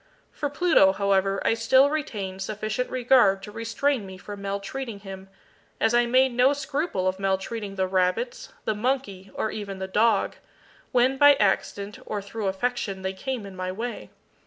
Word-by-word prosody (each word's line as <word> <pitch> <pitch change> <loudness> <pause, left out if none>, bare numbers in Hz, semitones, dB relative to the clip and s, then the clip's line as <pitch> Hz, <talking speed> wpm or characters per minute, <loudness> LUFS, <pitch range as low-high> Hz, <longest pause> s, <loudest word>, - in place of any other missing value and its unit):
For 290 - -3
Pluto, 290 - +4
however, 195 0 +1
I - - +4
still 260 +5 +4
retained 200 -11 -4
sufficient 215 +4 -3
regard 245 -6 +3
to 210 - -8
restrain 230 +3 -1
me 190 -1 -9
from 200 +2 -9
maltreating 200 +3 -5
him, 195 -1 -9 0.5
as 225 - +2
I 240 0 +4
made 260 +1 +3
no 250 +3 +4
scruple 285 - -2
of 185 0 -1
maltreating 195 +2 -2
the 190 -1 +1
rabbits, 185 +6 -1
the 220 - +1
monkey, 210 -4 -2
or 220 - -1
even 200 -2 -6
the 190 0 -4
dog, 215 +2 +2 0.5
when 255 +2 +3
by 290 +1 +7
accident, 200 -1 -1
or 210 - -2
through 200 +1 -5
affection, 195 -1 -2
they 190 0 -2
came 245 +3 -4
in 195 -1 -10
my 185 0 -3
way. 235 +5 -5
210 Hz, 165 wpm, -25 LUFS, 195-250 Hz, 0.5 s, by